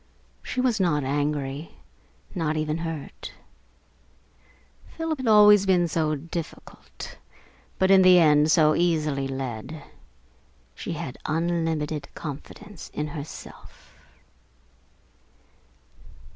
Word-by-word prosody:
She -, -, -5 dB
was 250 Hz, -4 st, +1 dB
not 160 Hz, -6 st, +1 dB
angry, 145 Hz, +1 st, -2 dB, 0.6 s
not 155 Hz, -4 st, -1 dB
even 155 Hz, +1 st, -1 dB
hurt. 165 Hz, -3 st, -6 dB, 1.6 s
Philip 325 Hz, -3 st, -2 dB
had 260 Hz, -, -3 dB
always 210 Hz, -2 st, +7 dB
been 180 Hz, -2 st, +3 dB
so 155 Hz, -1 st, 0 dB
difficult, 165 Hz, +2 st, -8 dB, 0.6 s
but 190 Hz, 0 st, +3 dB
in 190 Hz, -1 st, +7 dB
the 185 Hz, -1 st, +7 dB
end 150 Hz, -2 st, +5 dB
so 155 Hz, -2 st, +5 dB
easily 155 Hz, -5 st, 0 dB
led. 135 Hz, +2 st, -5 dB, 0.9 s
She -, -, -5 dB
had -, -, -6 dB
unlimited 160 Hz, -2 st, -1 dB
confidence 165 Hz, +6 st, -9 dB
in 150 Hz, 0 st, -2 dB
herself. 145 Hz, 0 st, -10 dB
160 Hz, 95 wpm, -25 LUFS, 150-180 Hz, 1.6 s, always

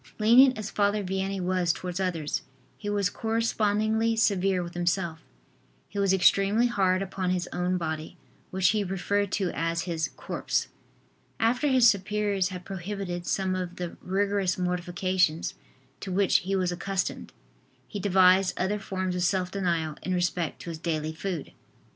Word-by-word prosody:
Lenient 245 Hz, +4 st, +6 dB
as 215 Hz, -1 st, -5 dB
Father 205 Hz, 0 st, +1 dB
Vianney 190 Hz, +1 st, -2 dB
was 180 Hz, -1 st, +1 dB
towards 180 Hz, +1 st, -5 dB
others, 170 Hz, -5 st, -1 dB, 0.3 s
he 205 Hz, -, -6 dB
was 205 Hz, -2 st, +1 dB
correspondingly 220 Hz, 0 st, +1 dB
severe 195 Hz, -4 st, +2 dB
with 170 Hz, 0 st, -8 dB
himself. 175 Hz, -1 st, -1 dB, 0.7 s
He 200 Hz, -, -5 dB
was 195 Hz, -1 st, +3 dB
extremely 195 Hz, +4 st, +4 dB
hard 195 Hz, -5 st, +2 dB
upon 190 Hz, -1 st, -3 dB
his 180 Hz, -1 st, -1 dB
own 180 Hz, +1 st, 0 dB
body, 160 Hz, -2 st, -4 dB, 0.3 s
which 185 Hz, -1 st, +2 dB
he 215 Hz, -2 st, +1 dB
referred 200 Hz, +1 st, -1 dB
to 190 Hz, -3 st, 0 dB
as 165 Hz, 0 st, -1 dB
his 165 Hz, -3 st, -2 dB
"corpse." -, -, -2 dB, 0.7 s
After 245 Hz, +6 st, +2 dB
his 260 Hz, -3 st, +6 dB
superiors 200 Hz, -2 st, +1 dB
had 180 Hz, -1 st, -8 dB
prohibited 190 Hz, -2 st, -5 dB
some 190 Hz, -1 st, 0 dB
of 180 Hz, -1 st, -3 dB
the 175 Hz, -2 st, -5 dB
rigorous 195 Hz, 0 st, 0 dB
mortifications 180 Hz, -2 st, 0 dB, 0.5 s
to 190 Hz, -, -6 dB
which 195 Hz, +1 st, +4 dB
he 195 Hz, 0 st, -2 dB
was 185 Hz, -2 st, +1 dB
accustomed, 190 Hz, +2 st, -3 dB, 0.6 s
he 205 Hz, -, -5 dB
devised 190 Hz, -1 st, +4 dB
other 205 Hz, +3 st, 0 dB
forms 185 Hz, -2 st, -3 dB
of 180 Hz, -, -1 dB
self 180 Hz, 0 st, +1 dB
denial 170 Hz, -6 st, -1 dB
in 185 Hz, -, -1 dB
respect 175 Hz, -2 st, -1 dB
to 170 Hz, -, -5 dB
his 160 Hz, -, -7 dB
daily 155 Hz, -2 st, -2 dB
food. 170 Hz, -1 st, -4 dB
185 Hz, 155 wpm, -27 LUFS, 180-200 Hz, 0.7 s, Lenient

